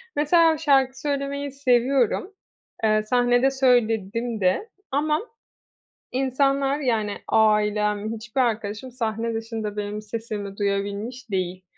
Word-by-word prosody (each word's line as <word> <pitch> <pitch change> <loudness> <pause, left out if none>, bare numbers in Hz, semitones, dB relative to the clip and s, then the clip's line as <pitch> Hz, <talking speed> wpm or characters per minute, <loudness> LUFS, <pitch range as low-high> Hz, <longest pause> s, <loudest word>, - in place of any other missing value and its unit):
mesela 320 +2 +4
şarkı 270 -3 +2
söylemeyi 280 -1 -2
seviyorum, 265 - +1 0.5
eee, 215 -1 +3
sahnede 245 +3 +3
söyledim 230 -4 +1
de 190 - +1 0.2
ama 300 +4 +1 0.9
insanlar, 275 +2 +1
yani, 220 -6 0
ailem, 210 0 +2
hiçbir 235 +4 -2
arkadaşım, 225 +1 -2
sahne 230 -1 -2
dışında 225 -2 -4
benim 210 +1 -3
sesimi 210 -2 -6
duyabilmiş 205 +4 -3
değil. 185 -1 -2
230 Hz, 100 wpm, -24 LUFS, 210-270 Hz, 0.9 s, mesela